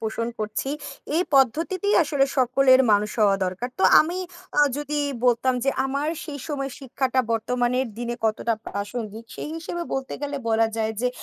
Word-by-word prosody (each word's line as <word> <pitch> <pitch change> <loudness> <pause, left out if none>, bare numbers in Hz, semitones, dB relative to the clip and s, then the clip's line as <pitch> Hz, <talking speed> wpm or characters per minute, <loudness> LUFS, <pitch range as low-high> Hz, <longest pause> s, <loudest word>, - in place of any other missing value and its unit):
পোষণ 225 +1 -2
করছি। 215 +4 -3 0.5
এই 345 - +4
পদ্ধতিতেই 335 - +2
আসলে 285 -3 +2
সকলের 260 +1 +5
মানুষ 210 +1 +2
হওয়া 200 -2 +5
দরকার। 185 +7 -3
তো - - +2 0.2
আমি 345 +4 -1 0.4
আ - - +7 0.2
যদি 295 0 -2 0.3
বলতাম 250 +1 +3
যে, 275 - +3
আমার 280 +3 -1 0.2
সেই 290 -3 -6
সময় 275 -2 -3
শিক্ষাটা 260 -1 0
বর্তমানের 245 +3 0
দিনে 240 0 -3
কতটা 225 +1 +1
প্রাসঙ্গিক? 215 +2 -5
সেই - - -6
হিসেবে 345 +1 -4
বলতে 270 0 -3
গেলে 285 0 -3
বলা 225 0 +3
যায় 220 0 0
যে, 250 - +2
255 Hz, 160 wpm, -24 LUFS, 225-285 Hz, 0.5 s, আ